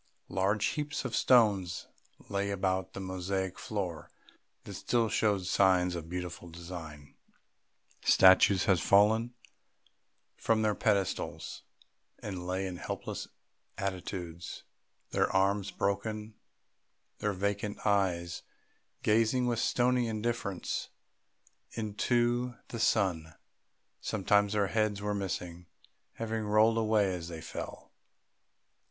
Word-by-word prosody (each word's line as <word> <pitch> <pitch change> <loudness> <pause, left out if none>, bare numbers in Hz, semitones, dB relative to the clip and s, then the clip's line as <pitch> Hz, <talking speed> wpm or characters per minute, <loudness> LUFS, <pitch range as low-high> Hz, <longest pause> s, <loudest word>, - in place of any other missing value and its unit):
Large 100 +3 +1
heaps 150 -2 -2
of 125 - -2
stones 100 -8 +3 0.4
lay 100 0 -1
about 95 -1 -1
the - - -6
mosaic 95 0 -3
floor 90 -7 -4 0.5
that 100 - -8
still 115 +4 +1
showed 105 -3 +1
signs 90 -1 +3
of 85 -2 -5
a - - -14
beautiful 90 0 -5
design; 80 -4 -9 0.9
statues 95 0 +6
had 95 -3 +4
fallen 110 +4 +4 1.0
from 110 -1 +1
their 105 -1 +2
pedestals 100 -4 -1 0.6
and 90 -4 -6
lay 95 +1 -1
in 90 -2 -5
helpless - - -5 0.5
attitudes, 90 -3 -5 0.5
their - - +1
arms 100 +1 +2
broken, 105 +2 -2 0.9
their 105 -1 0
vacant 100 +2 -2
eyes 90 -4 +1 0.6
gazing 115 +3 +3
with 120 -2 0
stony 125 0 +2
indifference 110 -4 -2 0.8
into 120 +3 0
the 115 - -5
sunshine. 85 -8 +1 0.6
Sometimes 100 0 +2
their 105 -1 +2
heads 110 0 0
were 105 0 -2
missing, 90 -3 -4 0.5
having 115 -1 -3
rolled 110 +2 +4
away 105 -3 +2
as 85 -2 -5
they 85 -2 -6
fell. 80 - -7
100 Hz, 110 wpm, -31 LUFS, 90-110 Hz, 1.0 s, statues